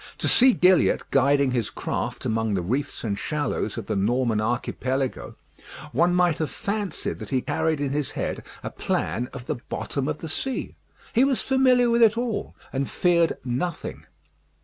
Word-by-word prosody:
To -, -, -1 dB
see 255 Hz, +1 st, +6 dB
Gilliatt 180 Hz, -2 st, +4 dB
guiding 140 Hz, 0 st, +3 dB
his 120 Hz, -4 st, 0 dB
craft -, -, -4 dB
among 110 Hz, -2 st, 0 dB
the 90 Hz, -, -1 dB
reefs 135 Hz, +10 st, -2 dB
and 100 Hz, -3 st, -2 dB
shallows 145 Hz, -7 st, -2 dB
of 115 Hz, -, -4 dB
the 110 Hz, -, -2 dB
Norman 115 Hz, +2 st, +1 dB
Archipelago, 130 Hz, +3 st, -2 dB, 0.6 s
one 175 Hz, +1 st, +3 dB
might 175 Hz, -3 st, +3 dB
have 155 Hz, -3 st, -1 dB
fancied 205 Hz, -2 st, -3 dB
that -, -, -7 dB
he 130 Hz, -, +1 dB
carried 160 Hz, +3 st, 0 dB
in 140 Hz, -2 st, -1 dB
his 145 Hz, -1 st, -1 dB
head -, -, -3 dB, 0.2 s
a -, -, -4 dB
plan 125 Hz, +3 st, -2 dB
of 130 Hz, -3 st, -8 dB
the 150 Hz, -1 st, -2 dB
bottom 140 Hz, -1 st, -3 dB
of 150 Hz, 0 st, -2 dB
the 165 Hz, -, -7 dB
sea. 265 Hz, +11 st, -3 dB, 0.4 s
He 245 Hz, -, +5 dB
was 270 Hz, -2 st, +2 dB
familiar 255 Hz, -2 st, +4 dB
with 235 Hz, 0 st, +3 dB
it 225 Hz, 0 st, +5 dB
all, 235 Hz, -3 st, -2 dB, 0.2 s
and 135 Hz, 0 st, -1 dB
feared 170 Hz, -2 st, +3 dB
nothing. 135 Hz, +7 st, -3 dB
145 Hz, 170 wpm, -25 LUFS, 125-185 Hz, 0.6 s, see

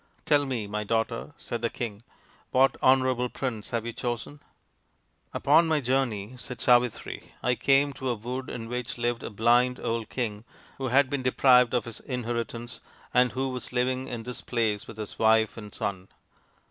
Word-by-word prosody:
" -, -, -37 dB
Tell 145 Hz, -2 st, +3 dB
me, 120 Hz, -5 st, -2 dB
my 105 Hz, +1 st, -3 dB
daughter," 115 Hz, +5 st, -2 dB
said 120 Hz, -, -5 dB
the 115 Hz, -, +1 dB
king, 110 Hz, -4 st, -5 dB, 0.3 s
" -, -, -29 dB
what 135 Hz, +1 st, +4 dB
honourable 130 Hz, -1 st, +3 dB
prince 115 Hz, -6 st, -4 dB
have 115 Hz, -1 st, -2 dB
you 120 Hz, -, -4 dB
chosen? 120 Hz, +5 st, -4 dB, 0.3 s
" -, -, -44 dB
" -, -, -43 dB
Upon 165 Hz, 0 st, +5 dB
my 160 Hz, -1 st, +2 dB
journey," 125 Hz, -5 st, 0 dB
said 125 Hz, -1 st, -6 dB
Savitri, 120 Hz, -1 st, +1 dB
" -, -, -30 dB
I 125 Hz, -, +3 dB
came 140 Hz, +3 st, +3 dB
to 130 Hz, 0 st, -4 dB
a 120 Hz, -, +1 dB
wood 125 Hz, +4 st, -5 dB
in 115 Hz, -2 st, -5 dB
which 125 Hz, +1 st, -4 dB
lived 120 Hz, 0 st, -1 dB
a -, -, -5 dB
blind 120 Hz, +4 st, +3 dB
old 115 Hz, -1 st, -2 dB
king 110 Hz, -4 st, -3 dB, 0.4 s
who 135 Hz, -, -1 dB
had 135 Hz, +2 st, +4 dB
been 140 Hz, 0 st, -2 dB
deprived 125 Hz, -1 st, +5 dB
of 120 Hz, -, 0 dB
his 115 Hz, -2 st, -7 dB
inheritance 120 Hz, -1 st, -4 dB, 0.3 s
and 125 Hz, 0 st, +4 dB
who 135 Hz, +1 st, -1 dB
was 125 Hz, -1 st, -5 dB
living 130 Hz, +1 st, 0 dB
in 120 Hz, -3 st, -5 dB
this 125 Hz, +1 st, -6 dB
place 110 Hz, -4 st, -1 dB
with 110 Hz, -, -10 dB
his 105 Hz, -2 st, -6 dB
wife 110 Hz, 0 st, +4 dB
and 105 Hz, -2 st, -9 dB
son. 95 Hz, -2 st, -4 dB
120 Hz, 195 wpm, -27 LUFS, 115-130 Hz, 0.4 s, Upon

